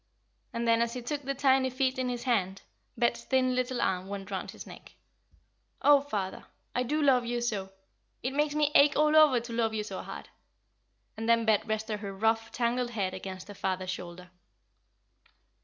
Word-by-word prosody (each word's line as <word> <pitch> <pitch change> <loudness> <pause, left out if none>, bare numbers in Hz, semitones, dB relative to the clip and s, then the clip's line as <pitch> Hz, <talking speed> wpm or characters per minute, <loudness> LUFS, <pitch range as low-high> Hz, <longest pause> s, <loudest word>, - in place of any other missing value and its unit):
And 235 0 -2
then, 230 0 +4
as 235 0 0
he 250 - -5
took 290 +4 -3
the 275 0 -3
tiny 265 -1 +3
feet 260 0 0
in 255 -1 0
his 245 -1 -4
hand, 195 -7 0 0.3
Bet's 235 - +1
thin 255 -1 +2
little 255 0 -1
arm 185 -3 0
went 200 0 -6
round 190 -2 -4
his - - -9
neck. - - -13 0.8
"Oh, 290 -1 +6
father, 205 -9 -4 0.3
I 250 - 0
do 300 +5 0
love 260 -3 +4
you 240 0 -2
so. 210 -5 -2 0.5
It 255 +2 -2
makes 295 +1 0
me 300 -1 +2
ache 290 +1 +6
all 305 +1 +3
over 300 -5 +7
to 235 0 -8
love 225 -1 0
you 210 - -1
so 210 - -6
hard;" - - -8 0.9
and 225 +1 -3
then 230 -1 +4
Bet 220 0 +2
rested 215 0 -2
her 200 -1 -6
rough, 225 +2 +1
tangled 245 +1 0
head 200 -5 -2
against 185 0 -7
her 205 - -8
father's 185 -1 -2
shoulder. 180 0 -8
235 Hz, 190 wpm, -29 LUFS, 205-260 Hz, 0.9 s, over